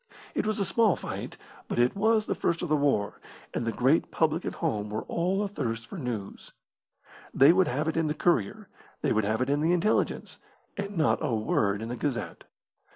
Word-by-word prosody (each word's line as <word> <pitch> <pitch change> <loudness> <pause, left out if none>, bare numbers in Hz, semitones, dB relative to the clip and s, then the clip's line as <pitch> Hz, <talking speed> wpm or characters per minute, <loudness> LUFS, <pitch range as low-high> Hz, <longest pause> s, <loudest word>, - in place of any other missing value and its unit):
It - - -1
was 215 -1 -1
a 200 - +1
small 220 +1 +3
fight, - - -6 0.3
but - - -3
it 120 +1 +3
was 220 +1 +2
the - - -1
first 170 0 -1
of 175 - -3
the 155 - +4
war, 140 -8 0 0.3
and 115 - -2
the - - +1
great 130 +8 +2
public 160 +1 0
at - - -3
home 105 -11 -2
were 110 +1 -3
all 185 +4 0
athirst 115 - -3
for 175 - -8
news. 115 -7 -6 0.8
They 140 +5 +7
would 185 0 +3
have 150 +5 -1
it 160 - -1
in 165 -1 +2
the 150 - -1
Courier; 125 - 0 0.4
they - - +2
would 110 -1 +1
have 110 +4 +1
it 130 - -4
in 145 +1 +1
the 165 +3 +3
Intelligence, 180 +5 0 0.4
and 200 -1 -5
not 155 - +3
a 115 - 0
word 105 -1 0
in 115 - -5
the 120 - -3
Gazette. 130 -1 -3
150 Hz, 210 wpm, -28 LUFS, 115-175 Hz, 0.8 s, They